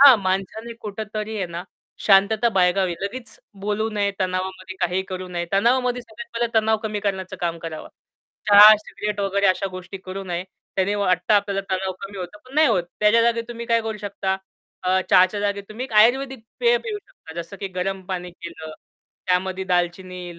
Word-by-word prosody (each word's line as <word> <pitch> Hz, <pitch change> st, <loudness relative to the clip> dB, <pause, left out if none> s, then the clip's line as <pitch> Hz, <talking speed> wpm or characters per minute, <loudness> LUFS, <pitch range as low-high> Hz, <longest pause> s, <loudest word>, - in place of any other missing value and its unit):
हां, 275 Hz, -4 st, +10 dB
माणसाने 195 Hz, +5 st, -2 dB
कुठेतरी 215 Hz, +1 st, -5 dB
आहे 190 Hz, -3 st, -1 dB
ना 170 Hz, +1 st, -6 dB, 0.4 s
शांतता 215 Hz, +3 st, +5 dB
बाळगावी. 180 Hz, -1 st, +2 dB
लगेच 230 Hz, +2 st, -6 dB, 0.2 s
बोलू 210 Hz, +2 st, -1 dB
नये, 205 Hz, -1 st, 0 dB
तणावामध्ये 185 Hz, 0 st, -3 dB
काहीही 180 Hz, +2 st, +1 dB
करू 185 Hz, -1 st, -5 dB
नये. 175 Hz, -1 st, -3 dB
तणावामध्ये 245 Hz, +4 st, +2 dB
सगळ्यात 235 Hz, +1 st, -10 dB
पहिले 235 Hz, 0 st, 0 dB
तणाव 220 Hz, 0 st, +3 dB
कमी 215 Hz, -2 st, -2 dB
करण्याचं 190 Hz, -2 st, -3 dB
काम 170 Hz, -1 st, -1 dB
करावं. 160 Hz, -1 st, -7 dB, 0.6 s
चहा, 210 Hz, +1 st, +10 dB
सिगरेट 210 Hz, -1 st, -4 dB
वगैरे 200 Hz, 0 st, +1 dB
अशा 185 Hz, +1 st, +2 dB
गोष्टी 185 Hz, +1 st, -8 dB
करू 190 Hz, +1 st, -6 dB
नये. 175 Hz, 0 st, -3 dB, 0.3 s
त्याने 195 Hz, +2 st, +2 dB
वाटतं 200 Hz, +1 st, +2 dB
आपल्याला 200 Hz, -1 st, +2 dB
तणाव 190 Hz, 0 st, -1 dB
कमी 195 Hz, 0 st, -7 dB
होतो 185 Hz, +3 st, -7 dB
पण 260 Hz, +2 st, -15 dB
नाही 310 Hz, -1 st, +5 dB
होत. 190 Hz, -6 st, +2 dB, 0.2 s
त्याच्या 210 Hz, +2 st, +5 dB
जागी 235 Hz, 0 st, +2 dB
तुम्ही 235 Hz, 0 st, -6 dB
काय 230 Hz, 0 st, +3 dB
करू 220 Hz, -1 st, -3 dB
शकता, 200 Hz, -2 st, -2 dB, 0.5 s
अ, 185 Hz, +1 st, +2 dB
चहाच्या 185 Hz, +3 st, +5 dB
जागी 200 Hz, 0 st, 0 dB
तुम्ही 230 Hz, +4 st, -5 dB
एक 235 Hz, -, -10 dB
आयुर्वेदिक 265 Hz, +1 st, +1 dB, 0.2 s
पेय 480 Hz, 0 st, +5 dB
पिऊ 425 Hz, -3 st, -5 dB
शकता. 160 Hz, -, -15 dB
जसं 170 Hz, +4 st, -11 dB
की 195 Hz, -, -3 dB
गरम 190 Hz, +1 st, -2 dB
पाणी 180 Hz, -1 st, -4 dB
केलं, 170 Hz, -3 st, -9 dB, 0.5 s
त्यामध्ये 185 Hz, +1 st, 0 dB
दालचिनी, 175 Hz, 0 st, -2 dB
200 Hz, 175 wpm, -23 LUFS, 185-220 Hz, 0.6 s, हां